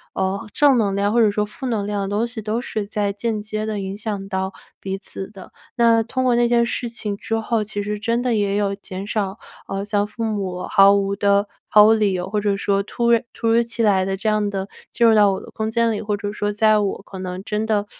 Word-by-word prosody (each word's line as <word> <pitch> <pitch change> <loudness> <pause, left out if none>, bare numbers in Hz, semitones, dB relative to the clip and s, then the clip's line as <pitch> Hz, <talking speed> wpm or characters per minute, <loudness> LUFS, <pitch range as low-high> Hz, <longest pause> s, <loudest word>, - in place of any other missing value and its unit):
呃， 195 +4 -1
正 285 -3 +5
能 200 -4 +1
量 200 +1 +1
或 235 - +4
者 215 -2 +4
说 210 +1 0
负 210 +6 -9
能 215 -4 -1
量 205 -1 -2
的 195 - -3
东 210 +4 0
西 235 -2 -7
都 215 +2 -2
是 220 -4 -3
在 205 -1 -1
间 215 +1 -2
接 215 0 -4
地 215 -1 -3
影 195 0 -4
响 205 -2 -4
到 190 -1 -2 0.3
彼 195 0 -3
此 195 -1 -8
的。 195 -3 -12 0.3
那 230 -1 +4
通 255 +3 -2
过 245 -1 +3
那 240 0 +3
件 235 0 +3
事 235 0 -3
情 215 -3 -4
之 225 +2 -3
后， 225 0 0
其 205 0 -4
实 210 +1 -3
真 230 +2 0
的 245 -2 +1
也 205 -1 +1
有 200 -1 0
减 195 0 -8
少， 205 -1 -2 0.3
呃， 195 +1 -3
像 205 -1 +1
父 215 +2 -6
母 195 -4 -3
毫 200 -1 +6
无 200 0 +1
地 200 0 +2 0.2
毫 210 0 +7
无 220 - +6
理 210 -3 +2
由 180 0 -3
或 210 +1 0
者 205 -1 +1
说 200 0 +1
突 235 +3 0
然 230 -1 +4
突 230 - -3
如 230 +1 +4
其 230 -1 -2
来 195 -3 +3
地 195 0 -1
这 210 +3 -4
样 210 -1 +1
地 195 -1 -3 0.3
进 235 - +3
入 225 - +6
到 205 -2 +5
我 190 - -3
的 - - -12
空 220 0 -3
间 230 0 +2
里， 210 - -2
或 210 -1 -1
者 205 0 -4
说 205 0 -2
在 215 +1 +3
我 200 -2 -2
可 195 -2 -10
能 185 0 -5
真 210 +1 -2
的 210 -2 +1
210 Hz, 275 characters per minute, -21 LUFS, 200-225 Hz, 0.3 s, 毫